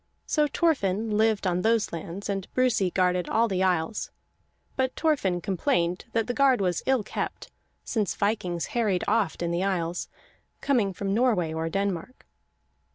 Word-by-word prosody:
So 300 Hz, -1 st, +2 dB
Thorfinn 225 Hz, -, +1 dB
lived 220 Hz, -1 st, +2 dB
on 180 Hz, -1 st, +1 dB
those 225 Hz, -2 st, +1 dB
lands, 170 Hz, +4 st, -6 dB
and 195 Hz, -2 st, -3 dB
Brusi 250 Hz, -7 st, +2 dB
guarded 180 Hz, -1 st, +1 dB
all 230 Hz, +1 st, +3 dB
the 190 Hz, -3 st, -1 dB
isles; 180 Hz, +1 st, 0 dB, 0.7 s
but 260 Hz, -1 st, 0 dB
Thorfinn 200 Hz, -, +1 dB
complained 180 Hz, -, 0 dB
that 225 Hz, -1 st, +1 dB
the 245 Hz, -, -2 dB
guard 270 Hz, -2 st, +4 dB
was 180 Hz, -3 st, 0 dB
ill 260 Hz, -4 st, +3 dB
kept, -, -, -5 dB, 0.3 s
since 215 Hz, -5 st, -1 dB
vikings 200 Hz, -5 st, -1 dB
harried 215 Hz, -6 st, +1 dB
oft 205 Hz, -5 st, +1 dB
in 170 Hz, -, -1 dB
the 170 Hz, +2 st, 0 dB
isles, 175 Hz, -3 st, -1 dB, 0.5 s
coming 235 Hz, -8 st, +1 dB
from 195 Hz, +1 st, -3 dB
Norway 215 Hz, -9 st, +2 dB
or 160 Hz, 0 st, -2 dB
Denmark. 195 Hz, +4 st, -3 dB
200 Hz, 155 wpm, -26 LUFS, 180-230 Hz, 0.7 s, guard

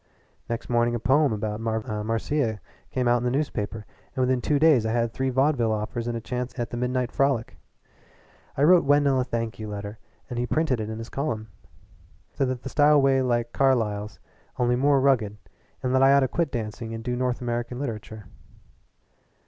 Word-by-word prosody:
Next 115 Hz, 0 st, -3 dB
morning 120 Hz, 0 st, +2 dB
a -, -, -2 dB
poem 135 Hz, +6 st, +3 dB
about 105 Hz, 0 st, -3 dB
Marvellous 110 Hz, -1 st, -2 dB
Marcia 115 Hz, +1 st, -1 dB, 0.3 s
came 125 Hz, -1 st, -1 dB
out 120 Hz, 0 st, +4 dB
in 120 Hz, -, -4 dB
his 125 Hz, -, +1 dB
newspaper, 110 Hz, -7 st, -2 dB, 0.3 s
and 130 Hz, -, 0 dB
within 125 Hz, 0 st, +1 dB
two 150 Hz, -, +1 dB
days 150 Hz, -6 st, +5 dB
I 110 Hz, -, -1 dB
had 115 Hz, -1 st, 0 dB
three 130 Hz, 0 st, -1 dB
vaudeville 130 Hz, -3 st, +2 dB
offers 110 Hz, +2 st, -3 dB
and 120 Hz, -1 st, -2 dB
a -, -, -3 dB
chance 125 Hz, +2 st, -5 dB
at 120 Hz, -2 st, -3 dB
the -, -, -4 dB
Midnight 125 Hz, 0 st, -1 dB
Frolic. 135 Hz, -5 st, 0 dB, 1.0 s
I 140 Hz, -, +2 dB
wrote 175 Hz, +3 st, +6 dB
Wendell 145 Hz, -1 st, +3 dB
a -, -, +2 dB
thank 115 Hz, -3 st, -3 dB
you 110 Hz, -, -5 dB
letter, 105 Hz, +1 st, -6 dB, 0.3 s
and 120 Hz, -2 st, -4 dB
he 125 Hz, -, -1 dB
printed 155 Hz, -5 st, +1 dB
it 110 Hz, 0 st, -4 dB
in 110 Hz, -, -5 dB
his 115 Hz, 0 st, -7 dB
column 115 Hz, -7 st, -3 dB, 0.8 s
said 135 Hz, -, 0 dB
that 125 Hz, -1 st, -3 dB
the 135 Hz, -, -5 dB
style 145 Hz, +2 st, +5 dB
was 135 Hz, -1 st, +3 dB
like 120 Hz, -1 st, 0 dB
Carlyle's, 110 Hz, -6 st, +1 dB, 0.4 s
only 125 Hz, -1 st, +2 dB
more 140 Hz, +2 st, +3 dB
rugged 120 Hz, -7 st, +2 dB, 0.5 s
and 130 Hz, 0 st, 0 dB
that 130 Hz, -, +4 dB
I 135 Hz, +1 st, +6 dB
ought 140 Hz, -, +5 dB
to 130 Hz, -, +2 dB
quit 165 Hz, +3 st, -1 dB
dancing 115 Hz, -1 st, -4 dB
and 115 Hz, -, -7 dB
do 125 Hz, 0 st, -2 dB
North 125 Hz, 0 st, -1 dB
American 120 Hz, 0 st, -3 dB
literature. 110 Hz, -5 st, -6 dB
120 Hz, 195 wpm, -25 LUFS, 115-135 Hz, 1.0 s, wrote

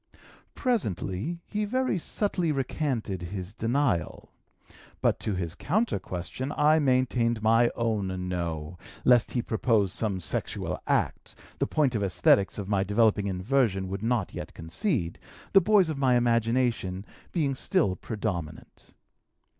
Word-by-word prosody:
Presently 170 Hz, -, -1 dB
he 210 Hz, 0 st, -2 dB
very 255 Hz, -2 st, 0 dB
subtly 180 Hz, -2 st, 0 dB
recanted 130 Hz, -, -2 dB
his 95 Hz, +2 st, -6 dB
denial. 115 Hz, -5 st, -1 dB, 0.7 s
But -, -, +1 dB
to 105 Hz, -, -2 dB
his 85 Hz, -3 st, -3 dB
counter 210 Hz, -, 0 dB
question 95 Hz, +10 st, -5 dB
I 155 Hz, +2 st, +5 dB
maintained 125 Hz, -4 st, +1 dB
my 115 Hz, +2 st, +5 dB
own 100 Hz, -6 st, -1 dB
no, 85 Hz, -2 st, -4 dB, 0.3 s
lest 120 Hz, -2 st, +4 dB
he 120 Hz, -, 0 dB
propose 110 Hz, -4 st, +1 dB
some 105 Hz, -5 st, -1 dB
sexual 75 Hz, -5 st, -3 dB
act, -, -, -1 dB, 0.2 s
a -, -, +1 dB
point 145 Hz, -5 st, +1 dB
the 110 Hz, -, -1 dB
esthetics 100 Hz, 0 st, +3 dB
of 100 Hz, -2 st, -4 dB
my 100 Hz, -2 st, +1 dB
developing 105 Hz, 0 st, +2 dB
inversion 95 Hz, 0 st, +1 dB
would 95 Hz, +1 st, -4 dB
not 115 Hz, -3 st, 0 dB
yet -, -, -7 dB
concede, 85 Hz, -, -2 dB, 0.3 s
the 195 Hz, -, +8 dB
boys 195 Hz, -1 st, +4 dB
of 155 Hz, -3 st, -3 dB
my 130 Hz, -2 st, +3 dB
imagination 115 Hz, -5 st, +1 dB, 0.3 s
being 150 Hz, -6 st, 0 dB
still 145 Hz, -, +1 dB
predominant. 90 Hz, -7 st, -6 dB
115 Hz, 130 wpm, -27 LUFS, 95-140 Hz, 0.7 s, the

